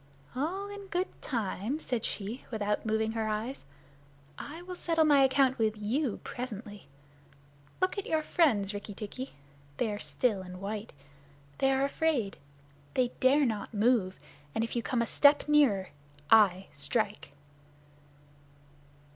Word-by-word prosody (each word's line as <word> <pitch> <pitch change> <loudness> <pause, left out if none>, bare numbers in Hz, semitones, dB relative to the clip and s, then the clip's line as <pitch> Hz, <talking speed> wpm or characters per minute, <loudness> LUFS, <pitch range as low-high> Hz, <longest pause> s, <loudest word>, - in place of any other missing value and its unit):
"All 355 +9 -2
in 405 -1 -8
good 365 0 -1
time," 230 +2 -2
said 245 -7 -2
she, 210 +5 -4
without 210 -1 -1
moving 220 0 +1
her 225 -1 -2
eyes. 215 - -3 0.7
"I 320 - -8
will 365 0 -7
settle 330 -2 +2
my 285 -2 +6
account 265 -1 +3
with 215 -1 +1
you 235 +3 0
presently. 215 -5 -7 0.9
Look 370 +2 +1
at 400 - -6
your 315 -1 +1
friends, 220 - +2
Rikki 205 0 -6
tikki. 255 +6 -6 0.4
They 225 - 0
are 205 - -4
still 215 -5 0
and 180 0 -9
white. 210 +2 -5 0.7
They 270 - +3
are 270 +1 +2
afraid. 280 -8 0 0.6
They 250 -2 +3
dare 275 +3 +5
not 220 -1 -3
move, 210 -4 +2 0.4
and 225 - +1
if 230 - -4
you 235 - +1
come 235 0 0
a - - -1
step 285 +5 +4
nearer 260 -11 +4 0.4
I 195 -4 +6
strike." 205 +5 -2
235 Hz, 140 wpm, -30 LUFS, 210-285 Hz, 0.9 s, my